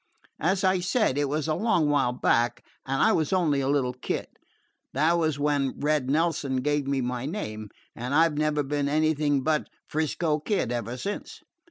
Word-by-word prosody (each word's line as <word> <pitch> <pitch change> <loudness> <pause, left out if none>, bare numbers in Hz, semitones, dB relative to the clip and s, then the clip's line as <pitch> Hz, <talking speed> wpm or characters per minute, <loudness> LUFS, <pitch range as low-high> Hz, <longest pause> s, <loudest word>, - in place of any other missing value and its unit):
As 190 +4 +1
I 185 0 +3
said, 185 - +1
it 145 -1 0
was 150 +2 -1
a 155 - +1
long 180 -4 +2
while 145 -4 +2
back, 120 -1 +1 0.2
and 135 0 +1
I 220 - +5
was 155 -7 +1
only 160 -7 +2
a 135 - -1
little 135 -3 +1
kid 125 - -3 0.7
that 155 +5 +3
was 160 -4 +1
when 145 -2 0
Red 145 -3 +1
Nelson 145 -4 +1
gave 145 -1 0
me 140 -1 0
my 125 +1 -3
name, 110 - -5 0.3
and 125 +4 -3
I 165 +2 +6
've 160 - -5
never 150 0 +1
been 140 0 -1
anything 150 -2 +1
but 155 0 0 0.2
'Frisco 155 0 -1
Kid 180 - -1
ever 120 0 -3
since. 200 +10 -6
150 Hz, 185 wpm, -26 LUFS, 135-160 Hz, 0.7 s, I